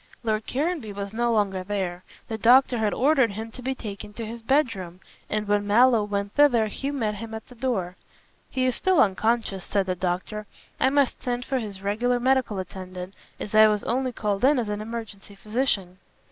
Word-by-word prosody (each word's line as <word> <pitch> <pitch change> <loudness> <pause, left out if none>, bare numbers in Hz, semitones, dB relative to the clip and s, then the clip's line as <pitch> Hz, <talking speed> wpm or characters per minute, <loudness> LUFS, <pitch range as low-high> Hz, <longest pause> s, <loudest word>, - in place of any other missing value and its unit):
Lord 215 -1 -1
Caranby 290 -5 -2
was 200 0 -5
no 235 +1 +1
longer 200 -4 +1
there. 185 -2 -3 0.2
The 220 -1 -4
doctor 245 +2 +5
had 215 -2 +1
ordered 265 -5 +3
him 220 +2 -6
to 255 - -10
be 265 +1 -2
taken 210 -3 -7
to 230 +1 -5
his 230 +2 -7
bedroom, 225 - 0 0.3
and 210 0 -1
when 205 0 +1
Mallow 230 +1 +5
went 200 -1 -3
thither 270 -7 +5
he 270 +6 -4
met 230 -7 -1
him 225 +2 -7
at 220 - -8
the - - -13
door, 220 -8 -2 0.5
"He 255 -1 0
is 255 -2 +1
still 375 -4 +2
unconscious," 210 -1 +1
said 200 -2 0
the 185 - 0
doctor, 185 +4 -3 0.3
"I 260 - +4
must 280 -1 +1
send 245 0 -2
for 265 -1 -1
his 200 -4 -7
regular 240 +5 +1
medical 255 -4 +1
attendant, 185 0 -7 0.3
as 210 - -6
I 215 0 +8
was 210 -1 0
only 255 +2 0
called 205 -3 -2
in 285 +2 +5
as 230 -4 -1
an 210 0 -3
emergency 215 -3 -7
physician." 205 -4 -1
220 Hz, 195 wpm, -25 LUFS, 200-250 Hz, 0.5 s, I